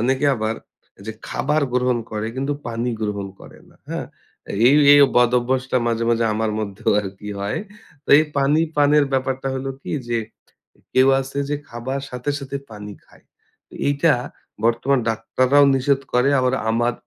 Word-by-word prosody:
অনেকে 130 +4 +1
আবার 110 -1 -2 0.4
এই - - -14
যে 110 - -4 0.2
খাবার 150 +2 0
গ্রহণ 125 -1 +1
করে 105 0 -3
কিন্তু 135 +2 -1 0.2
পানি 120 +1 -2
গ্রহণ 100 -2 -3
করে - - -14
না। - - -23
হ্যাঁ? - - -4 0.6
এই, 135 - +6 0.2
এই 145 - +7 0.2
বদঅভ্যাসটা 125 +1 +2
মাঝে, 115 0 0
মাঝে 115 0 +2
আমার 110 0 -1
মধ্যেও 105 +1 -2
আরকি 100 +1 -8
হয়। 100 +1 -2 0.5
তো - - -24
এই 155 - +3
পানি 140 +3 +3 0.2
পানের 145 0 +4
ব্যাপারটা 130 0 -1
হলো 135 +1 -3
কি - - -6 0.2
যে 120 -1 0 0.8
কেউ 130 +1 +5
আছে 135 +1 -6
যে 145 - -1
খাবার 125 +4 -4
সাথে, 125 +3 -3
সাথে 140 0 -5
পানি 105 -1 -9
খায়। - - -23 0.6
এইটা 145 +2 +3 0.5
বর্তমান 120 +4 +2
ডাক্তাররাও 130 +5 +2
নিষেধ 135 +1 +1
করে 125 +2 +3
আবার 130 0 +1 0.2
আমার 120 +1 +1
125 Hz, 160 wpm, -21 LUFS, 115-135 Hz, 0.8 s, এই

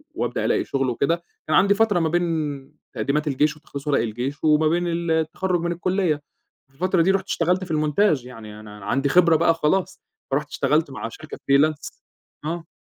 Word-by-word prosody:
وأبدأ - - -2
ألاقي - - +1
شغل 135 -1 -1
وكده 165 +8 0 0.2
كان 155 - +2
عندي 200 +1 +5
فترة 205 -3 +2
ما 165 -1 +1
بين 155 -5 -2 0.2
تقديمات 150 +2 -1
الجيش 150 +2 +1
وتخليص 145 -1 -9
ورق 145 - +2
الجيش 120 +7 -4
وما 155 0 +4
بين 175 +2 +1
ال 170 0 -1
التخرّج 175 +3 0
من 170 0 -1
الكلية، 180 -1 0 0.5
في - - -31
الفترة 180 +4 +1
دي 185 +4 +4
رُحت 195 0 0
اشتغلت 180 +3 0
في 180 - -7
المونتاج، 155 -1 +2
يعني 110 -4 -10
أنا 105 -1 -11
عندي 135 +2 0
خبرة 170 +1 +5
بقى 165 +1 +4
خلاص، 165 +4 -1 0.3
فرُحت - - -1
اشتغلت - - +1
مع - - -5
شركة - - -10
freelance 145 +2 +1 0.4
آه. 165 +1 -4
155 Hz, 185 wpm, -23 LUFS, 140-175 Hz, 0.5 s, عندي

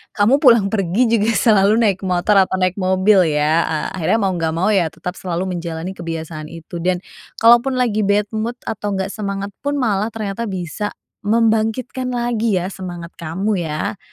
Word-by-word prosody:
kamu 220 +7 +4
pulang 235 -8 +5
pergi 205 +4 +1
juga 225 -1 +2
selalu 215 0 +4
naik 200 -4 +1
motor 185 +3 +2
atau 185 - -3
naik 185 +1 +1
mobil, 185 +1 +4
ya? 150 +3 +2
Ah, 155 -1 -2
akhirnya 190 +4 +1
mau 195 -1 +1
enggak 165 -2 -1
mau 185 +6 +1
ya 190 -5 +3
tetap 180 +3 -7
selalu 180 +1 -3
menjalani 170 +1 -5
kebiasaan 160 -2 -5
itu 165 +1 -9
dan 180 0 +1 0.4
kalau 235 +1 +8
pun 270 0 -2
lagi 230 -4 +1
bad 205 +1 +1
mood 230 +3 -3
atau 205 -1 -3
enggak 190 0 -2
semangat 200 -2 -4 0.2
pun 285 0 0
malah 215 -4 0
ternyata 215 +1 -4
bisa 185 +3 -4 0.3
membangkitkan 225 +3 +1
lagi 235 -3 0
ya 180 +2 -2
semangat 175 -2 -7
kamu, 185 +5 -2
ya? 155 +5 -3
195 Hz, 175 wpm, -19 LUFS, 175-220 Hz, 0.4 s, kalau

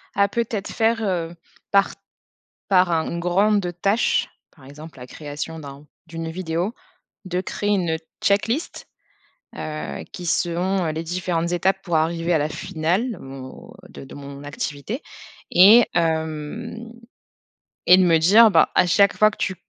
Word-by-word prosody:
à 200 - +3
peut-être 215 -1 -3
faire, 225 0 +1
heu, 175 -4 -2 0.4
par 200 0 +3 0.8
par 185 -2 +4
un 160 -1 0
une 170 - -3
grande 190 +2 +1
tâche- 200 +4 +1 0.3
par 140 -5 -18
exemple, 145 +1 -12
la 125 - -10
création 150 +3 -7
d'un 140 -1 -11 0.2
d'une 165 0 -6
vidéo- 175 +3 -3 0.5
de 180 -1 -2
créer 205 +2 -3
une 175 -5 +1 0.2
check-list, 225 +9 -1 0.7
heu, 155 0 -6
qui 180 - -8
selon 175 +2 0
les 160 +1 -4
différentes 170 0 -2
étapes 190 +2 0
pour 175 -3 -1
arriver 165 +2 0
à 165 - +3
la 150 0 -1
finale, 185 +9 -2
bon, 135 -1 -10 0.2
de - - -11
de 135 - -12
mon 140 0 -10
activité, 145 - -5 0.5
et 210 +7 +7
hem, 160 +7 -2 1.1
et 180 - +8
de 185 - +4
me 170 -2 +4
dire, 210 +8 +6
bah: - - +3
«À - - +4
chaque 200 +3 +4
fois 215 - +5
que - - -14
tu 185 - -2
175 Hz, 150 wpm, -22 LUFS, 160-200 Hz, 1.1 s, et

